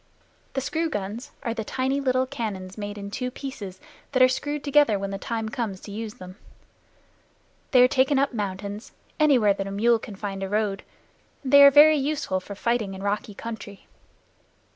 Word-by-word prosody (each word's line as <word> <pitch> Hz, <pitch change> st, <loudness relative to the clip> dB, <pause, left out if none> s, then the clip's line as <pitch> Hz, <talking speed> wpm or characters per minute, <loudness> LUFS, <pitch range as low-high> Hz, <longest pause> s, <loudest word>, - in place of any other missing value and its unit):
The 270 Hz, -, -1 dB
screw 325 Hz, +4 st, -1 dB
guns 210 Hz, +3 st, -5 dB
are 230 Hz, -, -1 dB
tiny 260 Hz, +5 st, -1 dB
little 255 Hz, -1 st, +1 dB
cannon 215 Hz, -8 st, -5 dB
made 205 Hz, -1 st, -6 dB
in 200 Hz, 0 st, -7 dB
two 250 Hz, +4 st, -3 dB
pieces, 245 Hz, -8 st, -7 dB, 0.3 s
that 255 Hz, -1 st, +5 dB
are -, -, +8 dB
screwed 290 Hz, +3 st, -3 dB
together 285 Hz, -7 st, +4 dB
when 195 Hz, 0 st, -4 dB
the 195 Hz, -, -4 dB
time 225 Hz, +1 st, -3 dB
comes 220 Hz, -7 st, -3 dB
to 205 Hz, -, -10 dB
use 215 Hz, +1 st, -6 dB
them. 185 Hz, +1 st, -11 dB, 1.3 s
They 250 Hz, -2 st, +6 dB
are -, -, +7 dB
taken 265 Hz, +2 st, +2 dB
up 275 Hz, 0 st, +1 dB
mountains, 205 Hz, 0 st, -5 dB, 0.3 s
anywhere 255 Hz, -9 st, +5 dB
that 195 Hz, 0 st, -4 dB
a -, -, -5 dB
mule 230 Hz, +3 st, +3 dB
can 210 Hz, -2 st, -9 dB
find 195 Hz, -1 st, -5 dB
a 195 Hz, -, -3 dB
road, 205 Hz, -1 st, 0 dB, 0.6 s
and 265 Hz, 0 st, -4 dB
they 280 Hz, -, +10 dB
are 280 Hz, -, +11 dB
very 300 Hz, +2 st, +7 dB
useful 280 Hz, -9 st, -1 dB
for 200 Hz, +2 st, -9 dB
fighting 225 Hz, -3 st, -1 dB
in 190 Hz, -, -8 dB
rocky 210 Hz, +1 st, -2 dB
country. 220 Hz, -3 st, -8 dB
225 Hz, 185 wpm, -25 LUFS, 200-265 Hz, 1.3 s, are